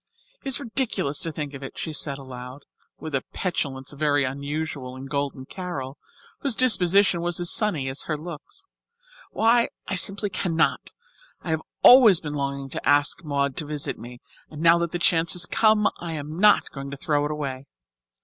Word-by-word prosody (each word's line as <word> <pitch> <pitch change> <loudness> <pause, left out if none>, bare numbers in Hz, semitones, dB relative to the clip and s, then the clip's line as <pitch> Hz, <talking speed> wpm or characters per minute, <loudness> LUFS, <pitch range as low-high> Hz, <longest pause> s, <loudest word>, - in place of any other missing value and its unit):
"It - - -9
is 270 - 0
ridiculous 225 - -1
to 165 - -3
think 150 -2 -5
of 140 - -8
it," 135 - -8
she 160 - -4
said 140 -2 -2
aloud, 130 0 -10 0.3
with 155 -2 -8
a 135 - +1
petulance 140 -7 -3
very 145 -1 +1
unusual 140 -1 -4
in 130 +1 -9
Golden 140 -1 -3
Carol, 145 -6 -6 0.4
whose 275 -5 +1
disposition 200 -7 +4
was 175 0 0
as 175 -1 +3
sunny 180 -11 +2
as 130 +1 -4
her 155 - -2
looks. 170 - -10 0.6
"Why, 230 +2 +2 0.2
I - - -3
simply 195 +2 +2
cannot. 165 -4 0 0.5
I 165 - -3
have 160 0 0 0.2
always 235 -8 +8
been 150 -2 -6
longing 140 -1 -3
to - - -2
ask 145 +3 +2
Maud 140 -3 -1
to 155 - -1
visit 150 -1 -3
me, 120 +1 -11 0.3
and 150 - -10
now 170 +1 +5
that 170 -1 -2
the - - -2
chance 170 -1 +3
has 180 0 0
come 215 +2 +3
I 170 -1 -5
am 150 0 -6
not 210 +1 +4
going 140 0 -7
to 140 - -7
throw 145 +1 0
it - - -2
away. 140 -3 -5
150 Hz, 185 wpm, -24 LUFS, 140-180 Hz, 0.6 s, always